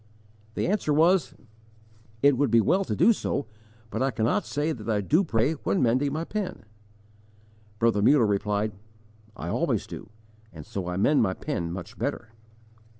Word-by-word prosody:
The - - -1
answer 190 -5 0
was: 165 +3 +3 0.9
"It 140 -1 +6
would 140 +1 +1
be 115 - +5
well 185 - +2
to - - -2
do 230 - +5
so, 145 - -2 0.5
but - - -3
I 135 - +2
cannot 115 -2 0
say 150 +3 -1
that 115 -6 -6
I 105 -2 +2
do 155 - +2
pray 125 -4 +1
when 100 -10 -1
mending 130 +4 +2
my 155 +3 -2
pen." 200 - -5 1.1
Brother 115 -2 +2
Muller 130 +2 +5
replied: 105 +1 0 0.7
"I - - -5
always - - 0
do, - - -9 0.4
and 80 -3 -10
so 95 -3 -5
I 90 0 -3
mend 140 +9 +3
my 95 -4 +1
pen 85 -1 -3
much 90 0 -8
better." 110 - -3
120 Hz, 165 wpm, -26 LUFS, 105-150 Hz, 1.1 s, It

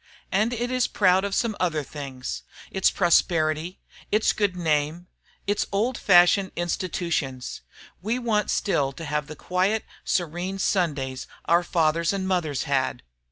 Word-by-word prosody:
And 215 +5 +2
it 245 +1 -2
is 255 -1 +2
proud 190 -1 +3
of 200 -1 -1
some 230 -3 0
other 160 -4 0
things, 135 -3 -6 0.3
its 190 - +3
prosperity, 170 -1 +2 0.3
its 215 +1 +3
good 205 -3 0
name, 160 0 0 0.4
its 205 +1 0
old 225 +6 +1
fashioned 185 0 +5
institutions. 170 -7 -2 0.4
We 220 +6 -1
want 225 -4 0
still 140 -9 +1
to 160 +5 -8
have 150 0 -2
the 155 - -8
quiet, 190 +7 0 0.2
serene 175 +2 -1
Sundays 145 -10 -1 0.2
our 170 +1 +4
fathers 165 0 +1
and 190 -1 -2
mothers 160 -7 0
had." 135 -2 -1
175 Hz, 140 wpm, -25 LUFS, 155-200 Hz, 0.4 s, fashioned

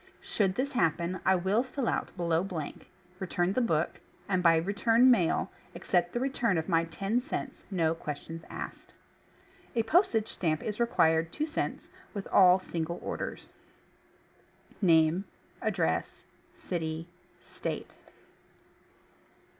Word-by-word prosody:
Sho'uld 195 -3 0
this 275 +2 -1
happen 170 - 0
I 190 - +5
will 190 +5 +2
fill 260 -1 -3
out - - 0
BELOW 170 -1 +1
blank, 160 -6 -6 0.3
return 180 0 0
the 255 - +1
BOOK, 165 -9 0 0.3
and 185 -2 +1
by 165 -2 +6
return 225 +8 +4
]\IAIL, 185 -9 +2 0.3
accept 175 -3 +1
the 240 - 0
return 245 -7 +1
of 160 - -2
my 165 0 +2
TEN 195 +8 -1
CENTS— 270 -1 -5
no 165 -5 +1
questions 165 +1 -6
ASKED. - - -8 0.8
A 230 - +2
postage 230 - +3
stamp 155 -4 -1
is 210 0 -4
required 165 -8 +3
(2 305 - -1
cents) 315 - -3 0.3
with 200 - -4
all 185 -1 +7
single 170 -2 -4
orders. - - -5 1.3
Name 165 0 +4 0.4
Address. - - -1 0.3
City 160 -2 -4 0.4
State - - -5
185 Hz, 125 wpm, -30 LUFS, 165-230 Hz, 1.3 s, all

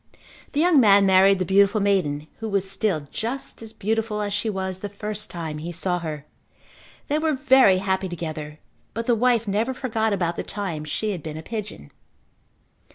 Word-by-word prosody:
The 290 - 0
young 335 -2 +5
man 200 -4 +6
married 195 +1 +5
the 185 - -1
beautiful 200 +3 +4
maiden 180 -8 +1
who 225 -1 -4
was 195 -1 0
still 190 -4 0
just 245 +3 -5
as 225 -1 -9
beautiful 220 0 -2
as 205 -1 -3
she 210 +2 -1
was 190 -2 -3
the 205 - -5
first 210 +1 -4
time 160 -3 -5
he 170 +3 -5
saw 180 +1 -2
her. 155 -3 -6 0.8
They 295 +2 +1
were 315 0 +1
very 265 -8 +5
happy 190 0 -1
together 155 -3 -6 0.4
but 230 0 -3
the 240 - +3
wife 235 -1 +2
never 220 +6 0
forgot 220 -4 -1
about 175 -4 -1
the - - -2
time 185 -7 -4
she 210 +8 -2
had 180 -5 -4
been 155 0 -6
a 160 - -7
pigeon. 210 - -7
200 Hz, 185 wpm, -24 LUFS, 175-220 Hz, 0.8 s, man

